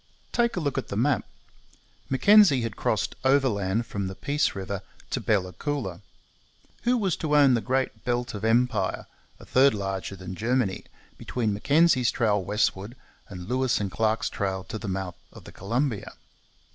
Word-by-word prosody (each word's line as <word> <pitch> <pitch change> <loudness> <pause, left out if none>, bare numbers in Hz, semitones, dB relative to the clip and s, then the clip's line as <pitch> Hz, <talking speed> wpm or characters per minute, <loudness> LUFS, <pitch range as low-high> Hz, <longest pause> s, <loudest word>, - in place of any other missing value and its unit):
Take 235 -1 +1
a - - -1
look 140 -4 -1
at - - -7
the 100 - -4
map! 140 +5 +1 0.8
Mackenzie 155 - +6
had 115 -3 -4
crossed - - -1
overland 115 -6 +2
from 100 -3 -4
the 95 - -6
Peace 145 +7 0
river 95 0 -4 0.3
to - - -1
Bella 95 -4 0
Coola. 120 - -4 0.8
Who 245 +1 +3
was 195 -7 0
to 150 -2 +1
own 140 -3 +6
the 115 - +2
great 130 +5 -1
belt 120 -1 -1
of 105 - -6
empire 115 -3 +1 0.3
a - - -13
third 135 -2 +4
larger 95 -1 -4
than 95 0 -8
Germany 115 -1 -1 0.3
between 115 -4 -1
Mackenzie's 140 +3 +3
trail 105 -4 +1
westward 105 +2 -1 0.3
and 90 -3 -8
Lewis 130 +1 +1
and 100 -2 -3
Clark's 110 0 0
trail 95 -2 -3
to 110 -1 -4
the 105 - -6
mouth 95 -2 -4
of - - -13
the - - -12
Columbia? 115 +3 -2
115 Hz, 165 wpm, -26 LUFS, 100-135 Hz, 0.8 s, Mackenzie